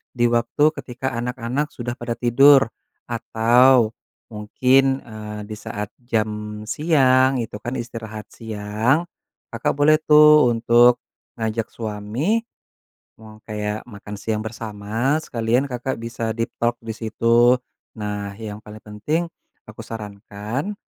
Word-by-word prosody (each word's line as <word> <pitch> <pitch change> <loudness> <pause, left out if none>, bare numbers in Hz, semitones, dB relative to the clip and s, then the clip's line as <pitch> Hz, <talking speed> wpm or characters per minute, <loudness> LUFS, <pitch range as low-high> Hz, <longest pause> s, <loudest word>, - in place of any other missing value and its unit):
di 120 - 0
waktu 120 +6 +2
ketika 130 +1 -5
anak-anak 125 +4 -2
sudah 120 -2 -6
pada 120 0 -3
tidur 135 +4 +6 0.5
atau 120 +1 +4 0.4
mungkin, 130 +5 +2
eee, 105 -2 -8
di 110 - -7
saat 105 -1 -6
jam 105 -2 -3
siang, 130 0 +3
itu 115 -2 -4
kan 125 +2 -4
istirahat 110 -3 -7
siang, 110 +7 -1 0.5
Kakak - - -1
boleh 155 +2 +4
tuh 150 -3 +7
untuk 120 +1 +5 0.4
ngajak 110 0 -2
suami, 115 - -2 0.7
mau 110 -1 -14
kayak 105 0 -4
makan 105 -2 -9
siang 105 +1 -2
bersama 110 +6 -2
sekalian 120 +3 0
Kakak 125 +1 -3
bisa 115 -1 -3
deep 115 0 -2
talk 120 0 +1
di 115 - -7
situ. 115 +2 +3 0.4
Nah, 105 -2 -5
yang 105 -1 -6
paling 105 0 -12
penting 105 +11 -2 0.5
aku - - -11
sarankan, 105 - -5
115 Hz, 120 wpm, -22 LUFS, 110-130 Hz, 0.7 s, tuh